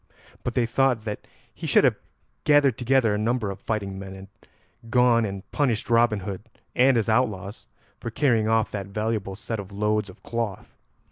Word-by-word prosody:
But - - -3
they 125 - +3
thought 125 0 +2
that 105 -1 -5 0.3
he - - -6
should - - +5
have - - +3 0.4
gathered 145 -4 +4
together 125 -2 +2
a 105 - -1
number 110 -1 0
of 95 - -8
fighting 100 -3 -3
men 95 0 -8
and 95 0 -11 0.6
gone 120 -1 +4
and 100 -2 -5
punished 120 -6 0
Robin 115 -3 +4
Hood 95 0 -5 0.3
and 130 0 +5
his 110 - +1
outlaws 110 -4 -1 0.3
for - - -4
carrying 115 -3 +2
off 110 0 +2
that 100 -2 -4
valuable 105 -1 -2
set 110 +1 -5
of 100 0 -8
loads 105 0 0
of 90 - -15
cloth. 115 -5 -4
110 Hz, 180 wpm, -25 LUFS, 100-120 Hz, 0.6 s, should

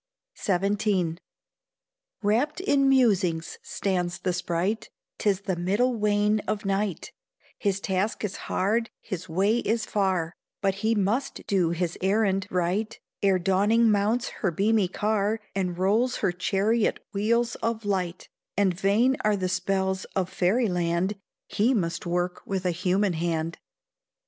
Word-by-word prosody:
XVII. 195 -3 +1 1.0
Wrapped 230 - +1
in 280 -8 +3
musing 205 -11 +3 0.2
stands 180 -3 -2
the 185 - -1
sprite: 180 +4 -1 0.3
'Tis 205 -2 +1
the 190 -2 -2
middle 200 +9 +1
wane 210 0 +2
of 210 0 -2
night, 195 -1 -1 0.5
His 200 -2 0
task 195 +3 -1
is 200 -2 -2
hard, 225 +5 +1
his 185 -3 -6
way 200 +8 +2
is 225 0 0
far, 185 -5 0 0.3
But 195 -1 +1
he 225 +1 +2
must 225 +8 -1
do 185 -4 +2
his 170 0 -2
errand 195 0 +1
right 180 +5 -1 0.2
Ere 195 -2 +4
dawning 205 +5 +3
mounts 210 +4 +1
her 195 - +2
beamy 200 +4 +2
car, 210 +3 0
And 180 -3 -2
rolls 215 +7 +2
her - - +1
chariot 200 +5 +1
wheels 235 +4 +1
of 225 -1 -2
light; 185 -3 -2 0.3
And 200 -3 +3
vain 210 +9 +2
are 210 -1 +3
the 185 -2 -1
spells 190 0 0
of 190 -1 0
fairy 220 +7 +2
land, 175 +2 0 0.3
He 235 +6 +1
must 175 -3 -2
work 175 +1 -1
with 190 -1 -3
a 180 - +2
human 185 +3 +1
hand. 165 0 -2
195 Hz, 140 wpm, -26 LUFS, 180-215 Hz, 1.0 s, Ere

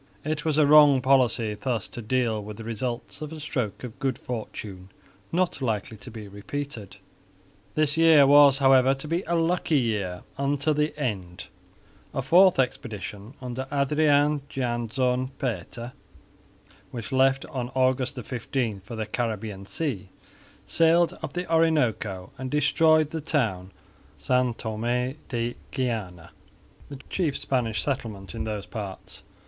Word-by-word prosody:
It 155 -1 -2
was 155 -2 +1
a 155 - +5
wrong 145 -2 +7
policy 125 -4 +2
thus 110 +1 -2
to 120 - -7
deal 115 -2 0
with 105 0 -8
the 115 - -8
results 120 +5 -4
of 155 0 -5
a 160 - -7
stroke 130 -9 -3
of 125 -1 -8
good 135 -2 -1
fortune 105 -5 -7 0.4
not 175 -4 0
likely 110 -3 -2
to 125 - -11
be 110 -3 -9
repeated. 105 +2 -6 0.8
This 155 0 +1
year 160 -3 +7
was, 140 -1 +7
however, 135 -1 +5
to 135 +3 -8
be 165 +3 0
a 170 - +1
lucky 165 -1 +1
year 100 -7 -2 0.2
unto 145 +2 +1
the 150 +1 -1
end. 95 -10 -3 0.7
A 135 - -1
fourth 180 +7 +6
expedition 110 -3 -3
under 125 +1 -4
Adrian 145 +1 +3
Jansz 125 0 -1
Pater 120 -1 -4 1.0
which 115 -2 -7
left 135 0 +3
on 125 -2 -4
August 130 +1 +1
15 120 -2 -3
for 100 +5 -9
the 110 -1 -3
Caribbean 105 -3 -4
sea, 115 - -3 0.6
sailed 165 +1 +3
up - - -5
the 180 0 -3
Orinoco 120 - +1
and 130 0 -4
destroyed 155 +2 +3
the 160 - -3
town 110 - 0
of - - -25 0.5
San 125 +4 +2
Thomé 120 +5 -2
de 120 -1 -2 0.2
Guiana, 105 - -3 0.6
the 140 - -7
chief 160 -7 -1
Spanish 120 -5 -1
settlement 105 - -4
in - - -4
those 105 -2 -4
parts. 100 -5 -7
125 Hz, 145 wpm, -26 LUFS, 110-145 Hz, 1.0 s, wrong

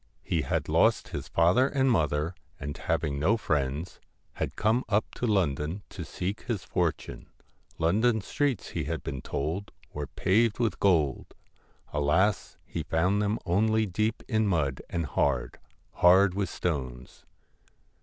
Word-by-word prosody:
He 80 - 0
had 65 - -1
lost - - +3
his - - -5
father 90 +11 +4
and 135 -2 +2
mother, 75 - +1 0.3
and, 70 +1 -5
having 70 -1 -1
no 100 +10 +3
friends, 75 -3 -2 0.3
had - - -4
come 110 +4 +2
up 105 0 +2
to 120 - -2
London 85 -2 0
to 95 - -7
seek 95 +6 -4
his 115 -6 -3
fortune. 85 -4 -2 0.5
London 110 +8 +2
streets, 140 +3 -1
he - - -3
had 80 +1 -3
been 65 -2 -5
told, 80 +11 -3 0.2
were 75 -1 -4
paved 110 - +2
with 115 -6 0
gold. 80 -9 +1 0.6
Alas! 85 +7 +1
he - - -4
found 90 +6 +1
them 105 +1 0
only 110 +5 +2
deep 110 +4 -1
in 110 -3 +1
mud, 75 -8 0
and 85 -2 -2
hard 70 -2 0 0.3
hard 95 +2 +5
with 100 -2 -1
stones. 65 -7 -4
90 Hz, 145 wpm, -28 LUFS, 75-105 Hz, 0.6 s, hard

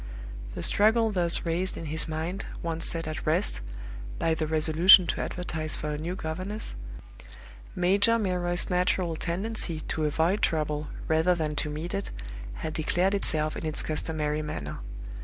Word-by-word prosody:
The - - -4
struggle 220 +2 +3
thus 175 -4 +3
raised 175 +3 0
in 165 - -6
his 160 +2 +3
mind 160 +4 -3 0.2
once 165 -1 -3
set 165 -1 -4
at 155 - -4
rest, 175 +6 +1 0.6
by 165 - +1
the 160 -1 -1
resolution 160 +4 +7
to - - -2
advertise 160 -3 -2
for 150 - -4
a 150 - -2
new 170 +4 -3
governess, 185 +6 -5 1.0
Major 200 +6 +4
Milroy's 180 -4 0
natural 180 -1 +1
tendency 175 -1 -2
to 155 0 -2
avoid 165 +7 +1
trouble 150 -1 0 0.2
rather 160 +3 +3
than 155 -3 -2
to 150 - -1
meet 155 +5 -5
it 195 0 -2 0.6
had 155 - -3
declared 175 +5 +1
itself 155 -6 +1
in - - -6
its 155 -1 +1
customary 155 -1 -1
manner. 75 - -5
165 Hz, 155 wpm, -28 LUFS, 155-185 Hz, 1.0 s, resolution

